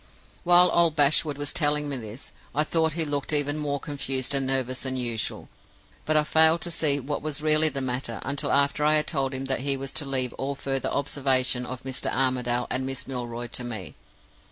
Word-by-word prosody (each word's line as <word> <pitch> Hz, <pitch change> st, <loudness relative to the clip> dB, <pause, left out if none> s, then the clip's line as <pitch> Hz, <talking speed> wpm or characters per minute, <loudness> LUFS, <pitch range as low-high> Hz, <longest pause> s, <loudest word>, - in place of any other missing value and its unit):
"While 175 Hz, 0 st, +6 dB
old 170 Hz, -2 st, +4 dB
Bashwood 145 Hz, 0 st, +3 dB
was 145 Hz, 0 st, -4 dB
telling 150 Hz, -1 st, +2 dB
me 140 Hz, -, -3 dB
this, 115 Hz, +1 st, -8 dB, 0.2 s
I 150 Hz, -, +3 dB
thought 160 Hz, 0 st, 0 dB
he 165 Hz, 0 st, 0 dB
looked 145 Hz, -1 st, -2 dB
even 145 Hz, 0 st, +2 dB
more 145 Hz, -1 st, -2 dB
confused 135 Hz, -3 st, -2 dB
and 135 Hz, -1 st, 0 dB
nervous 130 Hz, -1 st, -1 dB
than 130 Hz, -1 st, -3 dB
usual. 120 Hz, -3 st, -3 dB, 0.6 s
But 155 Hz, 0 st, +2 dB
I 150 Hz, -, +4 dB
failed 160 Hz, +2 st, +4 dB
to 175 Hz, -, -3 dB
see 150 Hz, -4 st, +2 dB
what 145 Hz, +2 st, -4 dB
was 150 Hz, -1 st, -3 dB
really 155 Hz, 0 st, +4 dB
the 135 Hz, -1 st, -4 dB
matter 125 Hz, -2 st, -3 dB
until 140 Hz, +2 st, -2 dB
after 140 Hz, +1 st, +2 dB
I 155 Hz, +1 st, +4 dB
had 150 Hz, -, +2 dB
told 135 Hz, -4 st, -1 dB
him 135 Hz, 0 st, -4 dB
that 135 Hz, 0 st, -1 dB
he 135 Hz, +1 st, 0 dB
was 135 Hz, 0 st, -6 dB
to 145 Hz, -, -1 dB
leave 130 Hz, -2 st, -1 dB
all 140 Hz, +1 st, -2 dB
further 135 Hz, -1 st, -2 dB
observation 130 Hz, -3 st, 0 dB
of 130 Hz, 0 st, -7 dB
Mr. 130 Hz, -1 st, -2 dB
Armadale 125 Hz, -2 st, 0 dB
and 130 Hz, -, 0 dB
Miss 135 Hz, -1 st, -4 dB
Milroy 120 Hz, -2 st, -4 dB
to 125 Hz, -, -3 dB
me. 110 Hz, -, -6 dB
140 Hz, 205 wpm, -25 LUFS, 130-150 Hz, 0.6 s, While